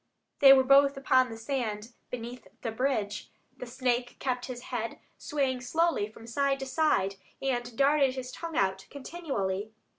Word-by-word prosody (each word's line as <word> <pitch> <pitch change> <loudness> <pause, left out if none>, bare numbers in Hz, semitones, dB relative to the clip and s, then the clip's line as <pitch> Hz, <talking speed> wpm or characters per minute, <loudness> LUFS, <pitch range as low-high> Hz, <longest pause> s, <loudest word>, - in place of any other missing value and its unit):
They 275 -1 +9
were 265 -1 +7
both 275 +1 +5
upon 260 -2 +3
the 225 - -7
sand 225 -2 -3 0.2
beneath 245 0 -7 0.2
the 230 - -2
bridge. 220 -4 -1 0.3
The 250 - -8
snake 245 -1 -1
kept 250 -2 -2
his 250 -1 -7
head 230 -1 -3 0.2
swaying 265 -4 -1
slowly 320 -3 +1
from 225 +1 -14
side 275 +4 +1
to - - -3
side, 260 -9 +1 0.2
and 245 -3 -2
darted 275 -1 +3
his 255 -1 -5
tongue 330 +2 -6
out 190 0 0
continually. 240 - -4
255 Hz, 155 wpm, -29 LUFS, 230-275 Hz, 0.3 s, They